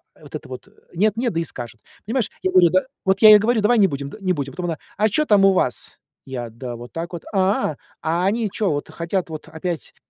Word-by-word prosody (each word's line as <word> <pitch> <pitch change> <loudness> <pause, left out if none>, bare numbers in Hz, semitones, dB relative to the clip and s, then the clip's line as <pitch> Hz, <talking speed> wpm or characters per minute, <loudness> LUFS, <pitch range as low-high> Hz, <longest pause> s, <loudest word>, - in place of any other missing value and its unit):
э, - - -24
вот - - -10
это - - -8
вот 130 - -8 0.3
нет, 210 +4 +2
нет 240 0 0
да 165 - 0
и - - -3
скажет. 120 -5 -8 0.2
Понимаешь, 230 +1 -1
я 185 - +1
говорю, 180 -2 +6
да, 185 +1 +4 0.2
вот 190 0 +2
я 215 - +10
ей 210 -1 +10
говорю: 225 +1 +1
"Давай 235 +4 +3
не 200 - +6
будем, 140 -4 -5
д - - -10
не 185 -1 +1
будем". 140 -4 -4
Потом 180 0 -4
она: 165 -2 -2 0.2
"А 215 - +3
чё 305 +9 +2
там 205 -6 +5
у 195 - +6
вас?" 125 - -1 0.3
Я: 125 -3 -5
"Да 120 +2 -7
вот 120 +1 -10
так 170 +2 -5
вот". 170 - -6
"А, 190 -6 +1 0.2
а 165 +3 0
они 215 +2 +1
чё 205 -2 0
вот 145 -1 -3
хотят 170 +2 -3
вот 155 -1 -8
опять" 160 +1 -5
180 Hz, 255 wpm, -21 LUFS, 145-205 Hz, 0.3 s, я